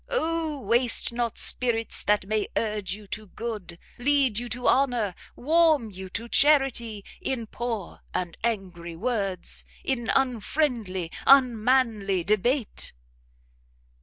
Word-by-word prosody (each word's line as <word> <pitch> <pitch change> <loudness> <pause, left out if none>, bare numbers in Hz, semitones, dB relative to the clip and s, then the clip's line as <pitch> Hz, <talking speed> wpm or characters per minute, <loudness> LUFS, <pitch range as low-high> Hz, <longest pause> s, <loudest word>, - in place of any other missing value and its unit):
Oh 325 - -1
waste 235 +2 +2
not 235 -1 -2
spirits 230 -2 +1
that 210 -2 +1
may 215 +1 0
urge 210 -4 -1
you 210 0 -13
to 215 0 -6
good, 210 -5 -6 0.2
lead 265 -4 +2
you 245 0 -6
to 245 +2 -3
honour, 245 -8 +2 0.2
warm 310 -5 +3
you 190 0 -8
to 230 +5 -5
charity, 240 -7 +3 0.2
in 245 -4 -2
poor 225 -4 -5
and 175 -2 -3
angry 180 -7 -3
words, 195 -2 -1 0.2
in 240 -4 -1
unfriendly, 235 - 0 0.2
unmanly 230 -7 +4
debate!" 220 - 0
230 Hz, 115 wpm, -26 LUFS, 205-255 Hz, 0.2 s, unmanly